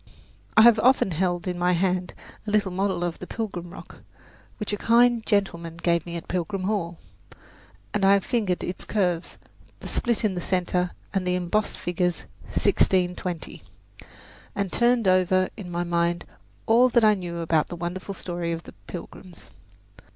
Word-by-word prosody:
I 220 - +9
have 230 -2 +7
often 250 -4 +4
held 175 +1 -1
in 180 -1 -2
my 180 +1 +3
hand 180 0 0 0.3
a - - -1
little 205 -2 +2
model 190 -1 -1
of 175 -1 -3
the 180 - -8
Plymouth 195 -6 -4
Rock - - -11 0.6
which 210 -1 -4
a - - 0
kind 235 +1 +4
gentleman 170 -6 0
gave 170 -1 0
me 170 - -5
at 165 - -9
Pilgrim 185 +2 -2
Hall, 185 -4 -1 1.0
and 205 - 0
I 195 +1 +6
have 200 -1 +2
fingered 210 -8 0
its 180 - -4
curves, 180 -5 -1 0.4
the - - -8
split 235 -1 0
in 205 - +1
the 180 - -3
centre 180 0 0 0.2
and 190 -2 -1
the 180 - +2
embossed 180 +4 -1
figures 175 0 -1 0.2
"1620," 180 -2 0 0.9
and 200 -2 -2
turned 240 -3 +2
over 185 0 +3
in 195 -5 -8
my 175 0 -2
mind 170 0 0 0.4
all 240 +3 +5
that 235 -1 +3
I 215 -1 +6
knew 175 -4 -5
about 165 -2 +1
the - - -6
wonderful 180 +3 -5
story 175 -2 -4
of 165 0 -4
the - - -12
Pilgrims. 180 0 -10
180 Hz, 165 wpm, -25 LUFS, 175-205 Hz, 1.0 s, I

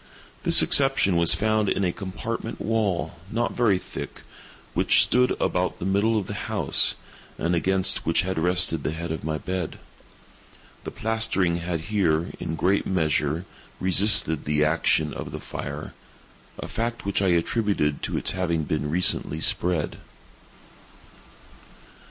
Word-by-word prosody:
This - - +5
exception 135 -9 +3
was 85 0 +4
found 110 -1 +1
in 100 - 0
a 90 - +1
compartment 110 +5 -5
wall, 105 -6 -1
not 120 +1 -1
very 110 -6 +2
thick, - - -8 0.5
which - - +5
stood 125 0 +2
about 90 0 0
the - - -5
middle 100 +4 +2
of 100 - -1
the - - -5
house, - - 0 0.4
and 85 +2 -1
against 95 +2 +1
which 80 - +2
had 95 -2 -2
rested 90 -2 +2
the 75 - -2
head 85 +1 -5
of 80 -4 -4
my 80 0 -2
bed. 90 0 -4 1.1
The - - -3
plastering 110 -6 0
had 85 -1 -3
here, 85 -4 0
in 80 - -3
great 95 +5 +1
measure, 80 -2 0 0.3
resisted 95 -4 +3
the 75 0 +2
action 75 -1 +1
of - - -6
the - - -6
fire—a 70 +2 -9
fact 115 -1 -3
which 100 0 0
I 95 - +2
attributed 85 -3 +1
to - - -2
its - - +1
having 85 -4 -1
been 75 0 -2
recently 80 -2 +1
spread. 85 -1 +1
90 Hz, 140 wpm, -25 LUFS, 80-100 Hz, 1.1 s, This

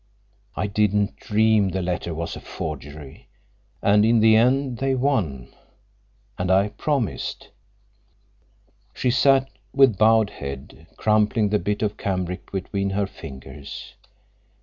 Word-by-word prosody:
I - - -1
didn't 105 0 +1
dream 110 -2 +2
the 95 0 -2
letter 90 -1 -2
was 80 +1 -4
a - - -7
forgery. 70 0 -8 0.6
And 105 +1 +5
in 115 +1 +4
the 110 0 +6
end 125 +2 +2
they 135 0 +1
won—and 90 - -5
I 95 +2 +3
promised." 135 -2 -3 1.5
She 125 - +1
sat 135 +1 +4 0.3
with 135 -7 +5
bowed 110 -1 +4
head, 70 +4 -8
crumpling 105 0 +2
the 105 0 +2
bit 105 +4 -2
of 105 -1 -1
cambric 90 -2 -3
between 100 +1 -2
her 100 +1 0
fingers. 70 -4 -10
105 Hz, 120 wpm, -23 LUFS, 90-110 Hz, 1.5 s, the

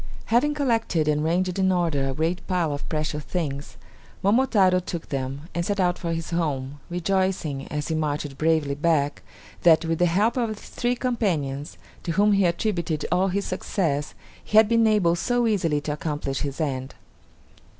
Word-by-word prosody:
Having 295 +5 +3
collected 225 - +1
and 150 0 +2
ranged 180 +3 0
in 190 0 +3
order 165 -7 +1
a 135 - -3
great 165 +4 -1
pile 175 -5 0
of 145 - -6
precious 150 -1 -2
things, 145 -5 -4 0.5
Momotaro 200 -4 +4
took 170 -2 -6
them, 135 0 -3
and 170 - -1
set 200 +3 -1
out 180 -1 +1
for 170 -2 -3
his 165 0 -4
home, 145 -5 -2
rejoicing, 180 -5 -1
as 150 +1 -4
he - - 0
marched 150 -2 -2
bravely 155 -2 +1
back, 145 -1 +1 0.4
that, 165 -1 +5
with 165 0 -1
the 175 - +4
help 205 +9 +2
of 235 -3 +1
his - - -13
three 245 0 -1
companions, 165 - -2 0.2
to 170 - -3
whom 205 +3 +4
he 200 -1 +3
attributed 170 -4 -1
all 180 +2 +3
his 195 +2 -1
success, 165 -6 -2 0.3
he 215 - 0
had 220 -1 +8
been 230 0 +4
able 195 -6 +3
so 245 +7 +1
easily 170 -9 +1
to 150 0 -3
accomplish 145 -3 -3
his 140 0 -4
end. 135 -4 -3
170 Hz, 175 wpm, -25 LUFS, 150-195 Hz, 0.5 s, had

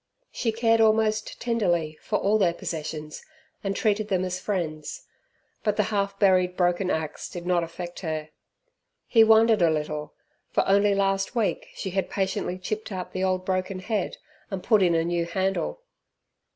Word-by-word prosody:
She 230 - -1
cared 225 0 +3
almost 215 -1 +2
tenderly 175 -10 0
for 210 - 0
all 210 +2 +2
their 175 -4 +2
possessions 155 -2 -5 0.4
and 195 -1 -1
treated 215 0 +1
them 185 -3 0
as 185 0 -3
friends. 165 -7 -4 0.6
But 210 -2 +1
the 210 - +3
half 200 -1 0
buried 185 -2 +3
broken 180 +1 +1
axe 160 -3 -3
did 175 -1 -7
not 175 -1 +2
affect 175 +1 -7
her. 155 -3 -4 0.8
He 225 -2 +6
wondered 220 -1 +5
a 170 - +5
little, 150 -1 -3 0.3
for - - +1
only 200 +1 +4
last 195 +3 0
week 225 -4 0
she 190 - -4
had 190 +1 -1
patiently 190 -1 -1
chipped 215 +4 -4
out 185 -2 -5
the 185 - -2
old 185 -1 0
broken 185 0 -1
head, 195 +1 -2 0.3
and 195 -3 -4
put 215 -4 +4
in 175 -3 +4
a 165 - +2
new 170 0 0
handle. 195 - -1
190 Hz, 165 wpm, -26 LUFS, 175-210 Hz, 0.8 s, He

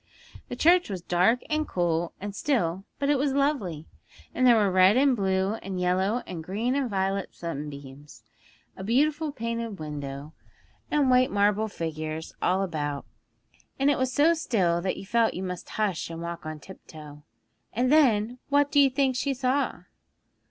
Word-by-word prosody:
The - - -4
church 350 -1 +4
was 185 -4 -5
dark, 185 +9 +2
and 310 0 -1
cool, 170 -1 -1
and 205 +1 -6
still, 195 - -1
but 280 - -1
it 285 - +2
was 275 0 +1
lovely; 250 - -1 0.5
and 255 0 +3
there 240 - +7
were 205 -3 +3
red 185 +4 +5
and 270 -1 +4
blue 190 -1 0
and 190 -1 -5
yellow 190 +6 +1
and 165 -3 -7
green 215 +9 -1
and 275 -3 0
violet 195 -1 -2
sunbeams, 145 -5 -8 0.5
and 190 - -7
beautiful 295 +5 +1
painted 230 -4 -4
windows, 145 -2 -6 0.6
and 285 -3 +2
white 255 0 +4
marble 205 +1 +2
figures 160 -4 -5
all 190 +2 +2
about, 145 -5 -3 0.7
and 275 +1 +3
it 280 - 0
was 260 0 0
so 295 +5 +4
still 185 - 0
that 185 +1 -2
you 195 - -8
felt 230 +2 +1
you 185 - -4
must 180 -2 -6
hush 205 -7 -2
and 165 0 -7
walk 170 -1 -6
on 155 -1 -6
tiptoe. 150 -4 -12 0.5
And 250 +4 0
then, 245 -5 +3
what 285 0 +3
do 290 - +4
you 275 -1 +6
think 265 -1 +1
she 275 +2 -1
saw?' 260 +2 -1
200 Hz, 170 wpm, -26 LUFS, 170-260 Hz, 0.7 s, there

